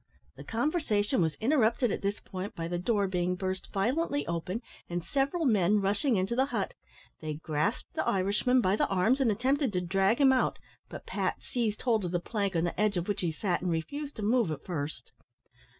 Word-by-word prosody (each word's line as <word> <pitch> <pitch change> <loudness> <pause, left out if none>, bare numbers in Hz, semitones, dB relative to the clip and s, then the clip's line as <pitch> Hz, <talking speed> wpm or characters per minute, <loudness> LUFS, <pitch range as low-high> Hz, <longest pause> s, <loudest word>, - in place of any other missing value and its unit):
The 140 - -10
conversation 230 - 0
was 160 -3 +1
interrupted 240 -2 +2
at - - -2
this 200 +1 -1
point 190 +1 -6
by 165 0 -3
the 175 0 -2
door 205 +1 +1
being 180 -1 0
burst 185 0 -4
violently 285 +9 0
open, 180 +7 -3 0.3
and 175 0 -2
several 280 - 0
men 210 -4 +4
rushing 205 +6 +1
into 190 +4 0
the 260 +2 +3
hut. - - -2 0.5
They 155 -1 -3
grasped 155 -1 -2
the - - -1
Irishman 205 +7 +2
by 190 -2 +2
the - - +2
arms, 210 +9 +2
and 240 -4 +4
attempted 260 +4 +1
to 180 - +1
drag 195 +5 +2
him 270 -2 +6
out, 255 - +1 0.3
but - - -8
Pat - - -2
seized 225 -4 -2
hold 225 -5 +2
of 180 - -2
the 175 - +1
plank, 200 0 -2
on 165 - +2
the 175 +3 -1
edge 210 -2 +2
of 175 - -2
which 205 - -1
he 175 -3 0
sat, 175 +3 -1
and 180 - -1
refused 280 - -3
to 215 - -5
move 230 -2 +3
at 150 -2 -5
first. 145 -8 -4
200 Hz, 205 wpm, -30 LUFS, 180-245 Hz, 0.5 s, him